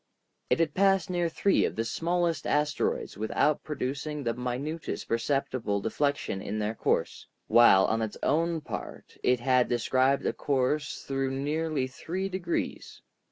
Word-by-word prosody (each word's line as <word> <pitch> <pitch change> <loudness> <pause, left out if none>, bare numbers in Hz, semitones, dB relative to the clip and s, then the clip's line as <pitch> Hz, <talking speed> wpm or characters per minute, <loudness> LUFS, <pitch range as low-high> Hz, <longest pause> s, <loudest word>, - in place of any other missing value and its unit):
It - - +3
had 160 -3 +1
passed 195 -1 +3
near 175 -1 +1
three 195 +4 +2
of - - -1
the 115 - -1
smallest 170 +4 -1
asteroids 150 -8 0
without 125 +7 +1
producing 145 0 -3
the 115 -2 0
minutest 130 +7 -4
perceptible 115 -3 0
deflection 140 -2 -1
in 105 +1 -4
their 105 +1 -1
course; - - -1 0.2
while, 115 -5 +6
on 115 0 0
its 110 -2 -3
own 165 +1 +1
part, - - -7
it 125 -1 +2
had 125 -1 +3
described 130 +3 +2
a - - +1
course 145 +1 -1
through 135 -1 -1
nearly 145 +1 -1
three 175 +8 -4
degrees. 180 -3 -4
140 Hz, 145 wpm, -28 LUFS, 120-160 Hz, 0.2 s, while